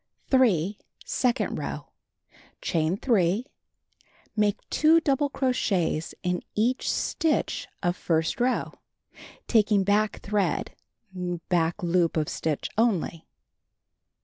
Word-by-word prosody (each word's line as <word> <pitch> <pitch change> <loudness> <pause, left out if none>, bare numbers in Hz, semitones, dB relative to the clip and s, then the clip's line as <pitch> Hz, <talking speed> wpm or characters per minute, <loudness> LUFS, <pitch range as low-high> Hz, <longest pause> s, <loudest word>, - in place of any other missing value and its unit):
3. 210 - +3 0.3
Second 250 -1 0
row: - - -6 0.7
Chain 165 +2 0
3. 210 -1 +2 0.9
Make 210 -2 0
2 315 +2 +5
double 285 -2 +1
cro 265 -2 0
chets 175 -9 -1
in 180 0 0
each 240 +5 +1
stitch 320 -2 0 0.2
of 175 -1 +1
first 165 +2 0
row, 250 +1 0 0.7
taking 210 -3 +3
back 210 +2 +1
thread 200 -4 -1 0.7
(back 175 +1 +1
loop 170 -1 +2
of 155 -1 0
stitch) 155 -3 -2
only. 190 -8 0
200 Hz, 100 wpm, -26 LUFS, 170-245 Hz, 0.9 s, 2